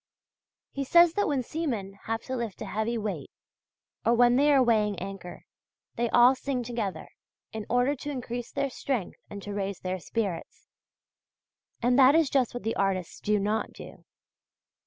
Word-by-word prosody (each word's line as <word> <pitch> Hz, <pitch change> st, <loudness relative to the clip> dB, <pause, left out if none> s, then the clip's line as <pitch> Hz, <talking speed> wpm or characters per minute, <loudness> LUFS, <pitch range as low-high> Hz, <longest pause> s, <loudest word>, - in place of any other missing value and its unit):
He 275 Hz, -, -3 dB
says 340 Hz, +4 st, +6 dB
that 410 Hz, +2 st, +1 dB
when 275 Hz, -3 st, 0 dB
seamen 235 Hz, -10 st, -3 dB
have 225 Hz, +1 st, -2 dB
to 260 Hz, -, -4 dB
lift 235 Hz, -5 st, -4 dB
a -, -, -6 dB
heavy 220 Hz, +2 st, -2 dB
weight, 200 Hz, -10 st, -4 dB, 0.7 s
or 235 Hz, +2 st, +3 dB
when 240 Hz, 0 st, +5 dB
they 290 Hz, +3 st, +4 dB
are 270 Hz, -2 st, +5 dB
weighing 210 Hz, -4 st, +2 dB
anchor, 190 Hz, -1 st, -8 dB, 0.5 s
they 235 Hz, 0 st, 0 dB
all 245 Hz, +3 st, +6 dB
sing 265 Hz, -1 st, -3 dB
together, 225 Hz, -5 st, -4 dB, 0.5 s
in 220 Hz, -1 st, -5 dB
order 245 Hz, +4 st, +2 dB
to 290 Hz, +2 st, -7 dB
increase 245 Hz, -3 st, -5 dB
their 275 Hz, -, -1 dB
strength 250 Hz, -6 st, -3 dB
and 200 Hz, -1 st, -8 dB
to 205 Hz, -, -5 dB
raise 200 Hz, -1 st, -3 dB
their 185 Hz, 0 st, -3 dB
spirits 200 Hz, -2 st, -4 dB, 1.2 s
and 245 Hz, +2 st, +3 dB
that 270 Hz, +2 st, +7 dB
is 320 Hz, -4 st, +3 dB
just 255 Hz, -3 st, +1 dB
what 245 Hz, -, -5 dB
the 225 Hz, -, -1 dB
artists 190 Hz, -3 st, -1 dB
do 210 Hz, 0 st, +1 dB
not 210 Hz, +2 st, -1 dB
do. -, -, -12 dB
235 Hz, 170 wpm, -28 LUFS, 205-260 Hz, 1.2 s, that